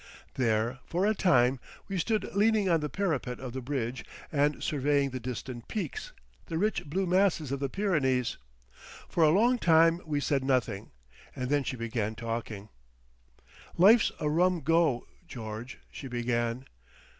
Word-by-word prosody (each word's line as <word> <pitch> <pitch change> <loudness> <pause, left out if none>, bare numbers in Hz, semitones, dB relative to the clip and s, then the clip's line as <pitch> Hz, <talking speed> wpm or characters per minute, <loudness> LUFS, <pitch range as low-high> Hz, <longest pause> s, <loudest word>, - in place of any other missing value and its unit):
There, 115 +1 0
for 180 +3 0
a 215 - +3
time, 130 - +3 0.3
we 195 -2 -2
stood 215 +4 0
leaning 210 0 +3
on 170 -2 +3
the 150 -1 -3
parapet 155 -11 -2
of 125 -2 -7
the 130 - -4
bridge 125 -2 -3 0.3
and 145 -1 +1
surveying 140 -1 +1
the 130 - -4
distant 125 0 -6
peeks, 435 - -4 0.4
the 165 - -3
rich 210 +4 0
blue 185 +7 -1
masses 180 -6 +2
of 140 - -2
the 140 -1 -2
Pyrenees. 135 - 0 0.7
For 170 - +1
a 155 - +6
long 235 +9 +3
time 165 -1 +4
we 150 -2 -1
said 140 -2 0
nothing, 120 -6 0 0.5
and 125 +1 -3
then 145 -1 +2
she 130 - -3
began 110 -2 -2
talking. 115 -2 -5 1.1
"Life's 215 +6 +6
a 150 - -1
rum 175 +3 +2
Go, 160 -4 +2 0.2
George!" 115 +1 -7
she 135 - -8
began. 120 0 -1
140 Hz, 155 wpm, -29 LUFS, 125-175 Hz, 1.1 s, a